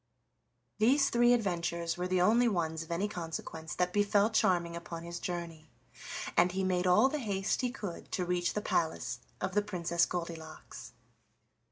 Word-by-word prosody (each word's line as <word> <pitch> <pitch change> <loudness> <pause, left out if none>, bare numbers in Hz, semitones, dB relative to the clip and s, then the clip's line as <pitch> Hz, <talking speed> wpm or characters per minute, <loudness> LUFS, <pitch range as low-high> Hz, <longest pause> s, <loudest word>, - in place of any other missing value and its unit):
These 270 +6 +4
three 240 0 +5
adventures 170 -6 0
were 180 +1 -2
the 185 -1 +1
only 230 +6 +4
ones 165 -6 -1
of 165 - -9
any 170 +5 0
consequence 165 -3 -6
that 180 0 0
befell 205 +1 +3
Charming 175 -5 +2
upon 170 -1 -7
his 170 0 -6
journey, 170 -3 -5 0.7
and 175 +1 +4
he 190 0 -1
made 185 -1 +1
all 210 +8 +6
the 300 +2 -2
haste 200 -3 -1
he 250 - 0
could 205 -9 -7
to 180 - 0
reach 175 0 0
the 210 - 0
palace 160 - -1 0.2
of - - -2
the 205 - +3
Princess 170 -4 0
Goldilocks. 165 -3 -7
180 Hz, 165 wpm, -31 LUFS, 170-205 Hz, 0.7 s, all